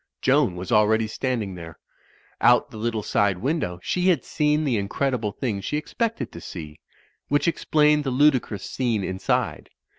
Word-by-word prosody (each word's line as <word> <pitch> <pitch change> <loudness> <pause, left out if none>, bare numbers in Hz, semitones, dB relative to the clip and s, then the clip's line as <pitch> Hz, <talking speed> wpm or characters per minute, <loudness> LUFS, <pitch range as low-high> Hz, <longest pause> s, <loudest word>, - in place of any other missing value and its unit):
Joan 90 - +2
was 90 +5 -6
already 110 0 +4
standing 110 -3 -2
there. 85 -3 -9 0.6
Out - - +4
the - - -9
little 110 -1 -2
side 100 -4 +1
window 125 - -2
she 180 0 0
had 170 -9 +3
seen 150 0 +1
the 135 -5 +1
incredible 110 +2 -1
thing 105 -3 -3
she 150 +9 -2
ex 150 - -7
pected 230 -1 -2
to 85 - -10
see; 75 -4 -8 0.5
which 145 +3 +1
explained 150 -2 +3
the 135 - -1
ludicrous 130 -7 +2
scene 115 -6 -1
in 95 0 -4
side. - - -1
115 Hz, 170 wpm, -24 LUFS, 100-150 Hz, 0.6 s, already